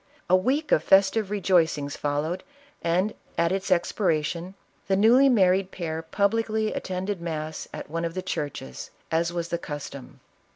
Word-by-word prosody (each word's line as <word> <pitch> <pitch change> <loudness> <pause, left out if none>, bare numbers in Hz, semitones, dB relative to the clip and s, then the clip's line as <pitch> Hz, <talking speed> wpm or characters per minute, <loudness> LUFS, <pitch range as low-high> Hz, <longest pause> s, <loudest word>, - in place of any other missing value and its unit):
A - - +8
week 270 +11 +1
of 155 - +4
festive 195 +3 +4
rejoic 185 -6 +2
ings 145 -1 -4
followed, 150 +4 -2 0.4
and, 180 +5 +1 0.2
at 170 +1 +2
its 195 +1 -2
expiration, 175 -1 0 0.3
the 195 - +3
newly 240 +7 +6
married 190 -5 +3
pair 160 -4 -4
publicly 215 +5 0
attended 185 0 -3
mass 155 -2 -4
at - - -7
one 165 +2 -3
of 165 0 -3
the 185 - -3
churches, 145 - -5 0.2
as 165 +1 +1
was 170 -1 -3
the 170 - -1
custom. 145 -4 -8
180 Hz, 155 wpm, -26 LUFS, 160-195 Hz, 0.4 s, A